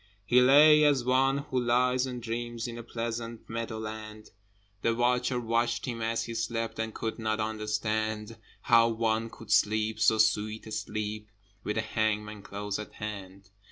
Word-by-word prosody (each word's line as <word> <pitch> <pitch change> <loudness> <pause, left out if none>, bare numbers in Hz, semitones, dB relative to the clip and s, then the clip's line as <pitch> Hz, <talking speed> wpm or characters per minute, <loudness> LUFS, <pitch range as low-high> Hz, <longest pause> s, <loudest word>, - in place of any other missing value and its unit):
He 125 +3 +5
lay 150 +4 +7
as 145 -4 +3
one 135 +2 +3
who 130 - +1
lies 125 +2 +2
and 125 -2 -6
dreams 120 0 -4
In 120 0 -7
a - - -5
pleasant 115 0 -5
meadow 115 0 -4
land, 110 0 -8 0.5
The 115 0 +1
watcher 125 +1 +1
watched 115 -1 0
him 120 -3 -4
as 115 +1 0
he 115 - -6
slept, 115 0 -3
And 110 0 -2
could 110 +1 -4
not 110 0 -1
understand 110 0 -2 0.3
How 115 -1 +5
one 115 0 0
could 115 -1 -11
sleep 110 +1 +2
so 110 0 +4
sweet 110 0 +1
a 110 - -9
sleep 105 0 -4 0.4
With 105 - -2
a - - +2
hangman 105 -1 -2
close 100 +1 -5
at 105 - -8
hand? 100 -2 -8
115 Hz, 165 wpm, -29 LUFS, 110-120 Hz, 0.5 s, lay